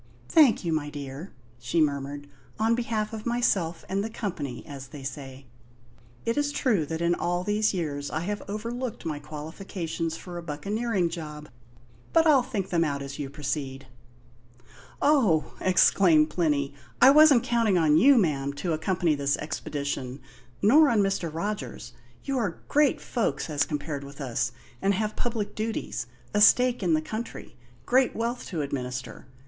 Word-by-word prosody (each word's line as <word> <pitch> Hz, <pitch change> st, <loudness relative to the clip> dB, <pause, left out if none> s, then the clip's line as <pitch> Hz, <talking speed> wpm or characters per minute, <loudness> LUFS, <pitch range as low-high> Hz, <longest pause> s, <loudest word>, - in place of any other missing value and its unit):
"Thank 290 Hz, -, +5 dB
you, 165 Hz, -, 0 dB
my 150 Hz, -2 st, -1 dB
dear," 145 Hz, +4 st, -7 dB, 0.3 s
she 120 Hz, +8 st, -1 dB
murmured; 145 Hz, -1 st, -1 dB, 0.3 s
"on 225 Hz, +1 st, +2 dB
behalf 225 Hz, -2 st, -1 dB
of 220 Hz, +1 st, -5 dB
myself 200 Hz, -9 st, 0 dB
and 195 Hz, +1 st, -1 dB
the 220 Hz, -, -3 dB
company, 165 Hz, -, -5 dB
as 135 Hz, -2 st, -8 dB
they 135 Hz, +2 st, -10 dB
say. 135 Hz, 0 st, -7 dB, 0.8 s
It 230 Hz, +5 st, +1 dB
is 290 Hz, 0 st, 0 dB
true 220 Hz, -, +1 dB
that 160 Hz, +1 st, -4 dB
in 170 Hz, 0 st, +3 dB
all 175 Hz, +1 st, -1 dB
these 210 Hz, +2 st, +1 dB
years 145 Hz, -6 st, -3 dB
I 155 Hz, -, -2 dB
have 205 Hz, +4 st, -3 dB
overlooked 230 Hz, +2 st, -4 dB
my 155 Hz, -3 st, -3 dB
qualifications 160 Hz, +2 st, -5 dB
for 175 Hz, -1 st, -8 dB
a -, -, -6 dB
buccaneering 190 Hz, +5 st, -1 dB
job; 150 Hz, -3 st, -7 dB, 0.6 s
but 330 Hz, 0 st, +5 dB
I'll 295 Hz, -5 st, +6 dB
think 200 Hz, -5 st, -4 dB
them 170 Hz, -2 st, +3 dB
out 140 Hz, -3 st, -2 dB
as 140 Hz, +1 st, -7 dB
you 140 Hz, -2 st, -4 dB
proceed." 140 Hz, -1 st, -4 dB, 1.2 s
"Oh!" 240 Hz, -, +3 dB
exclaimed 175 Hz, -4 st, +4 dB
Plinny, 145 Hz, -5 st, 0 dB, 0.3 s
"I 260 Hz, -, +9 dB
wasn't 295 Hz, -4 st, +7 dB
counting 230 Hz, -5 st, +2 dB
on 155 Hz, -3 st, +4 dB
you, 265 Hz, -, +6 dB
ma'am, 140 Hz, -8 st, +1 dB
to 165 Hz, +4 st, -2 dB
accompany 170 Hz, +1 st, +1 dB
this 140 Hz, -1 st, 0 dB
expedition; 140 Hz, -3 st, -4 dB, 0.4 s
nor 290 Hz, +8 st, +6 dB
on 225 Hz, -3 st, +3 dB
Mr. 195 Hz, -4 st, -1 dB
Rogers. 165 Hz, -, -5 dB, 0.3 s
You 270 Hz, -2 st, -1 dB
are 195 Hz, -8 st, -3 dB
great 295 Hz, -1 st, +3 dB
folks 225 Hz, -8 st, -2 dB
as 145 Hz, -1 st, +2 dB
compared 145 Hz, -1 st, -4 dB
with 140 Hz, +1 st, -11 dB
us, 120 Hz, -3 st, -1 dB, 0.3 s
and 195 Hz, 0 st, +2 dB
have 215 Hz, +1 st, -2 dB
public 225 Hz, -4 st, -2 dB
duties 215 Hz, -, -3 dB, 0.3 s
a 210 Hz, -, +2 dB
stake 250 Hz, +3 st, +5 dB
in 170 Hz, -4 st, +3 dB
the 155 Hz, -, +1 dB
country 220 Hz, +7 st, -6 dB, 0.3 s
great 255 Hz, -, +3 dB
wealth 235 Hz, +2 st, -3 dB
to 165 Hz, -6 st, -2 dB
administer. 125 Hz, -2 st, -5 dB
170 Hz, 160 wpm, -27 LUFS, 145-220 Hz, 1.2 s, I